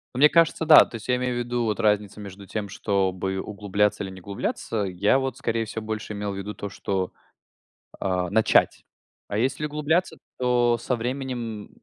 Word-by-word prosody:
Мне 145 Hz, +4 st, +6 dB
кажется, 165 Hz, 0 st, +3 dB
да. 155 Hz, -1 st, +9 dB
То -, -, -11 dB
есть 110 Hz, -, -8 dB
я 125 Hz, -, +3 dB
имею 125 Hz, 0 st, -1 dB
в -, -, -2 dB
виду 120 Hz, 0 st, -1 dB
вот 105 Hz, -1 st, -1 dB
разницу 105 Hz, -1 st, +1 dB
между 100 Hz, -1 st, -10 dB
тем, 105 Hz, +1 st, -3 dB
чтобы 95 Hz, -1 st, -1 dB
углубляться 105 Hz, 0 st, 0 dB
или 95 Hz, -, -6 dB
не 95 Hz, 0 st, -11 dB
углубляться. 100 Hz, +3 st, -3 dB
Я 100 Hz, +7 st, +2 dB
вот, 135 Hz, 0 st, -3 dB
скорее 115 Hz, 0 st, -1 dB
всего, 110 Hz, +1 st, -6 dB
больше 110 Hz, 0 st, -4 dB
имел 105 Hz, 0 st, -3 dB
в -, -, -5 dB
виду 100 Hz, +2 st, -5 dB
то, 100 Hz, -, -5 dB
что, 95 Hz, -1 st, -2 dB, 0.9 s
а, 90 Hz, -2 st, -1 dB
начать. 110 Hz, +2 st, +3 dB, 0.4 s
А 100 Hz, -, -3 dB
если 130 Hz, +6 st, 0 dB
углубляться, 150 Hz, +4 st, 0 dB, 0.2 s
то 120 Hz, -1 st, +3 dB
со 125 Hz, -, -1 dB
временем 120 Hz, -3 st, -4 dB
110 Hz, 185 wpm, -25 LUFS, 100-125 Hz, 0.9 s, да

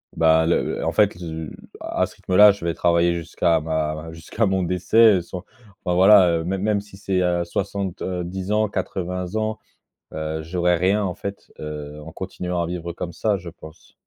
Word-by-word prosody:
bah, 80 Hz, 0 st, +4 dB
le 85 Hz, -, +2 dB
le -, -, -3 dB
en -, -, +1 dB
fait, 105 Hz, -4 st, +3 dB
heu, 80 Hz, -2 st, -6 dB, 0.3 s
à -, -, 0 dB
ce -, -, -13 dB
rythme-là, 105 Hz, +3 st, +6 dB
je 100 Hz, -, -8 dB
vais 85 Hz, -, 0 dB
travailler 85 Hz, 0 st, +2 dB
jusqu'à 85 Hz, 0 st, 0 dB
ma 80 Hz, 0 st, -1 dB
ma 80 Hz, +1 st, -8 dB
jusqu'à 85 Hz, +7 st, -2 dB
mon 95 Hz, -1 st, +1 dB
décès, 100 Hz, +5 st, +4 dB
heu, -, -, -1 dB
sans 90 Hz, +2 st, -8 dB, 0.4 s
enfin 90 Hz, -1 st, 0 dB
voilà, 95 Hz, 0 st, +7 dB
heu, -, -, -4 dB
même 95 Hz, +1 st, -2 dB
même 105 Hz, 0 st, +1 dB
si 100 Hz, -1 st, -15 dB
c'est, 95 Hz, -2 st, -1 dB
heu, 85 Hz, -1 st, +1 dB
70 95 Hz, 0 st, -4 dB
ans, 110 Hz, 0 st, +2 dB
80 90 Hz, -1 st, -4 dB
ans, 110 Hz, 0 st, -1 dB, 0.5 s
heu, 80 Hz, 0 st, -3 dB
j'aurais 90 Hz, +1 st, +1 dB
rien 100 Hz, +4 st, +2 dB
en 90 Hz, -3 st, -2 dB
fait, 100 Hz, 0 st, -7 dB
heu, 75 Hz, -1 st, -7 dB
en 80 Hz, +1 st, -10 dB
continuant 90 Hz, -2 st, -4 dB
à 85 Hz, -, -2 dB
vivre 85 Hz, -1 st, -5 dB
comme 85 Hz, -1 st, -5 dB
ça, 105 Hz, +4 st, 0 dB
je 85 Hz, -1 st, -8 dB
pense. 80 Hz, -1 st, -15 dB
90 Hz, 195 wpm, -22 LUFS, 80-95 Hz, 0.5 s, voilà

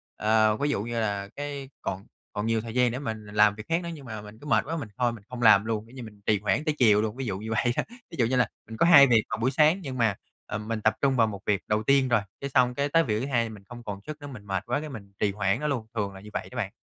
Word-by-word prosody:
ờ, 110 Hz, 0 st, +3 dB
ví 145 Hz, +4 st, 0 dB
dụ 105 Hz, -8 st, 0 dB
như 115 Hz, 0 st, -3 dB
là 100 Hz, -2 st, -2 dB
cái 140 Hz, -2 st, -5 dB
còn 95 Hz, +1 st, -4 dB, 0.3 s
còn 105 Hz, -, -2 dB
nhiều 115 Hz, -1 st, +1 dB
thời 115 Hz, -1 st, -7 dB
gian 125 Hz, -1 st, +3 dB
để 125 Hz, -, -4 dB
mình 110 Hz, -5 st, -5 dB
làm 105 Hz, 0 st, +3 dB
việc 110 Hz, -, -8 dB
khác 165 Hz, +2 st, +1 dB
nữa 170 Hz, -, -4 dB
nhưng 145 Hz, -4 st, -10 dB
mà 110 Hz, -3 st, -6 dB
mình 105 Hz, +1 st, -12 dB
cứ 145 Hz, -, -13 dB
mệt -, -, +3 dB
quá 165 Hz, +3 st, -3 dB
mình 145 Hz, -9 st, -6 dB
thôi 125 Hz, -2 st, +2 dB
mình 110 Hz, -4 st, -11 dB
không 125 Hz, -1 st, -6 dB
làm 110 Hz, -3 st, +6 dB
luôn, 110 Hz, -1 st, -2 dB
kiểu 125 Hz, -, -16 dB
như, 125 Hz, -, -7 dB
mình 105 Hz, -2 st, -12 dB
trì 105 Hz, -2 st, +3 dB
hoãn 110 Hz, +8 st, 0 dB
tới 155 Hz, -2 st, 0 dB
chiều 105 Hz, -4 st, +5 dB
luôn, 110 Hz, 0 st, -2 dB
ví 135 Hz, 0 st, -4 dB
dụ 100 Hz, -4 st, -2 dB
như 110 Hz, +2 st, -6 dB
vậy 120 Hz, +2 st, +1 dB
đó. -, -, +2 dB, 0.3 s
Ví -, -, -8 dB
dụ 120 Hz, -, +4 dB
như 125 Hz, +3 st, 0 dB
là 125 Hz, -, +3 dB, 0.2 s
mình 110 Hz, -, -7 dB
có -, -, +4 dB
2 140 Hz, -5 st, +9 dB
việc 115 Hz, -4 st, +4 dB
vào -, -, -2 dB
buổi 120 Hz, +4 st, +1 dB
sáng 155 Hz, +6 st, +4 dB
nhưng 135 Hz, -6 st, -5 dB
mà, 115 Hz, -4 st, +2 dB, 0.3 s
ờ, -, -, -4 dB
mình 110 Hz, +1 st, -4 dB
tập 110 Hz, +1 st, +3 dB
trung 135 Hz, -1 st, +3 dB
vào 115 Hz, -3 st, +4 dB
1 100 Hz, -3 st, -5 dB
việc 100 Hz, -1 st, +1 dB
đầu 105 Hz, 0 st, +1 dB
tiên 135 Hz, +2 st, +3 dB
rồi, 115 Hz, -3 st, +3 dB, 0.2 s
cái 140 Hz, -, -3 dB
xong 125 Hz, -2 st, +3 dB
cái 140 Hz, +2 st, 0 dB
tới 165 Hz, +3 st, +4 dB
việc 110 Hz, -6 st, -1 dB
thứ 125 Hz, -, -2 dB
hai 120 Hz, -4 st, 0 dB
mình 105 Hz, -3 st, -11 dB
không 120 Hz, -1 st, -9 dB
còn 100 Hz, -3 st, -5 dB
sức 155 Hz, -1 st, -7 dB
nữa, 145 Hz, -, -7 dB
mình 120 Hz, -7 st, -10 dB
mệt 95 Hz, -2 st, -2 dB
quá, 125 Hz, +3 st, 0 dB
cái 155 Hz, 0 st, -6 dB
mình 100 Hz, -7 st, -9 dB
trì 105 Hz, -, +2 dB
hoãn 100 Hz, +2 st, 0 dB
nó 150 Hz, -, -2 dB
luôn, 125 Hz, -7 st, -2 dB
thường 100 Hz, -3 st, -2 dB
là 95 Hz, -, -11 dB
như 105 Hz, -, -11 dB
vậy -, -, -4 dB
đó -, -, -11 dB
bạn. 105 Hz, -5 st, -2 dB
115 Hz, 325 wpm, -27 LUFS, 105-135 Hz, 0.3 s, 2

